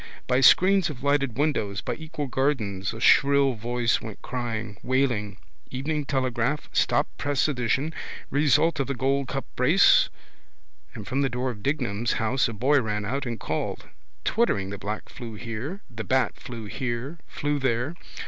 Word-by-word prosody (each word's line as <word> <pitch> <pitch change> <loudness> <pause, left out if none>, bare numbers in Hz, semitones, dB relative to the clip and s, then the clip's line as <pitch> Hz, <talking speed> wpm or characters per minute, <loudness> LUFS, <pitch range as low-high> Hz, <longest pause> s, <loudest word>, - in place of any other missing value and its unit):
By 125 +1 +2
screens 185 +7 +6
of 135 -3 -8
lighted 140 -4 +1
windows, 110 -10 0
by 125 - -3
equal 155 +2 -5
gardens 120 -8 -1
a 115 - -8
shrill 140 +2 +5
voice 120 +1 0
went 110 -3 -8
crying, 115 -4 -4
wailing: 120 -6 0 0.3
Evening 145 +3 -2
Telegraph, 130 0 -1
stop - - +2
press 145 0 +1
edition! 135 +3 0 0.4
Result 150 +3 +3
of 135 - 0
the 140 - -2
Gold 135 +2 0
Cup - - -3
races! - - +6 0.9
and - - -8
from 135 +2 0
the 135 - +2
door 125 +1 -2
of 105 -3 -10
Dignam's 120 -4 0
house 130 +4 +1
a 115 - -5
boy 135 +6 +3
ran 105 -2 -2
out 135 +4 -2
and 115 -1 -4
called. 80 - -3 0.4
Twittering 100 - +1
the 100 - -6
bat 105 +2 -4
flew 115 -3 -8
here, 120 - -3
flew 145 0 -1
there. 130 +3 0
130 Hz, 150 wpm, -26 LUFS, 115-140 Hz, 0.9 s, screens